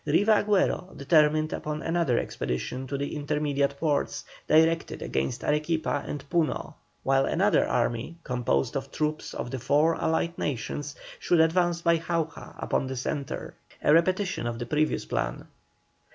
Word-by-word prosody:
Riva 205 +8 +3
Agüero 200 -2 +1
determined 155 +1 +3
upon 150 0 -4
another 165 -7 +1
expedition 125 - -3
to 140 +2 -3
the 140 +2 -3
intermediate 145 -1 0
ports, 150 -3 0 0.2
directed 165 +1 +3
against 65 0 -2
Arequipa 150 -1 0
and 145 -1 -5
Puno, 165 -1 0 0.3
while 135 0 +3
another - - +3
army, 120 +8 -1
composed 120 - 0
of 135 0 -3
troops 155 0 -2
of 120 - -4
the 130 - -3
four 150 +7 +3
Allied 165 +1 +1
Nations, 145 +2 -3 0.2
should 175 - +2
advance 170 +1 +3
by 170 -1 +4
Jauja 165 -1 -3
upon 135 - -1
the 130 - -4
centre, 140 +2 -4 0.3
a 150 - +5
repetition 180 - +2
of 120 -1 -3
the 120 - -4
previous 150 +5 0
plan. 65 0 -2
150 Hz, 145 wpm, -27 LUFS, 135-165 Hz, 0.3 s, a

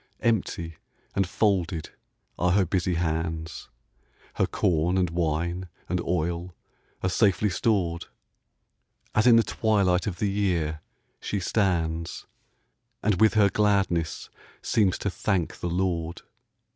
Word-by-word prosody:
Empty 85 -8 -1 0.4
and 95 -2 +1
folded 95 -6 0 0.5
are 90 0 +2
her 95 -1 +4
busy 90 0 0
hands; 80 -1 -3 0.6
Her - - +1
corn 85 +2 +1
and 90 -3 +1
wine 85 +2 -1 0.2
and 90 0 -1
oil 85 +1 -2 0.5
are 95 - +2
safely 105 0 +2
stored, 85 -3 0 1.1
As 110 +3 +3
in 120 - +8
the 115 - +6
twilight 100 -5 +1
of 90 -4 -3
the 100 +1 0
year 85 -6 0 0.4
she 100 - -2
stands, 85 -4 -1 0.8
And 105 -3 +1
with 110 0 +5
her 100 -2 +5
gladness 100 -7 +1 0.3
seems 100 -5 +2
to 100 - -2
thank 90 -3 -1
the 85 - -2
Lord. 85 -1 -2
90 Hz, 120 wpm, -26 LUFS, 85-100 Hz, 1.1 s, in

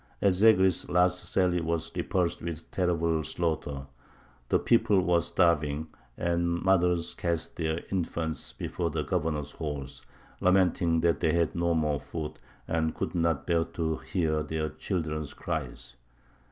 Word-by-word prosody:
Ez 95 -1 +2
Zegry's 95 -5 +4
last 90 0 +2
sally 90 -2 +2
was 80 0 -2
repulsed 90 -2 0
with 80 -1 -6
terrible 85 -3 +1
slaughter; 75 -5 -2 0.6
the - - +4
people 105 -4 +3
were 90 -2 +3
starving, 80 -3 +1 0.3
and 85 0 0
mothers 90 -3 +2
cast 85 -2 -2
their 80 0 -1
infants 85 -4 -2
before 85 -2 -3
the 80 -1 -2
governor's 75 -4 -1
horse, 75 -4 -5 0.4
lamenting 90 -3 +3
that 85 -3 +2
they 80 - +2
had 85 -2 +1
no 85 0 +1
more 75 -3 +1
food 75 -2 -6 0.3
and 80 -1 0
could - - -3
not 85 -4 0
bear 85 -2 +2
to 80 -1 -2
hear 80 -4 -1
their 80 +1 -2
children's 75 -2 -3
cries. 75 -8 -5
85 Hz, 140 wpm, -28 LUFS, 80-90 Hz, 0.6 s, Zegry's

